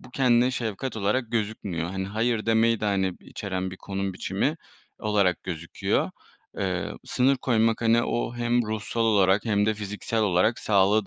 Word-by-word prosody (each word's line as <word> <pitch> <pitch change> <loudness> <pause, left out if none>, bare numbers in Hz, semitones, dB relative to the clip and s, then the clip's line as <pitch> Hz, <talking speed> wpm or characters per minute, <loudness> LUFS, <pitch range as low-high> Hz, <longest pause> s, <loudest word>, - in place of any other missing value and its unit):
bu 125 - -15
kendine 125 -1 +3
şefkat 120 0 -3
olarak 110 +3 0
gözükmüyor. 100 -6 -2
Hani, 95 0 -3
hayır 110 +2 -1
demeyi 115 0 +3
de, - - -2
hani, 95 -3 +1
içeren 95 -2 -4
bir 95 - -8
konum 95 0 -4
biçimi - - -1 0.4
olarak 100 -4 +1
gözüküyor. 85 -2 -2 0.5
Eee, 95 -3 -2
sınır 130 +2 +2
koymak, 115 -3 +1
hani, 115 +1 +4
o 120 0 -2
hem 120 0 +1
ruhsal 110 +2 -3
olarak 100 -2 +3
hem 105 -2 +2
de 110 - +2
fiziksel 105 +2 -3
olarak 100 +3 +2
sağlığı 100 +1 +3
105 Hz, 155 wpm, -26 LUFS, 95-115 Hz, 0.5 s, hani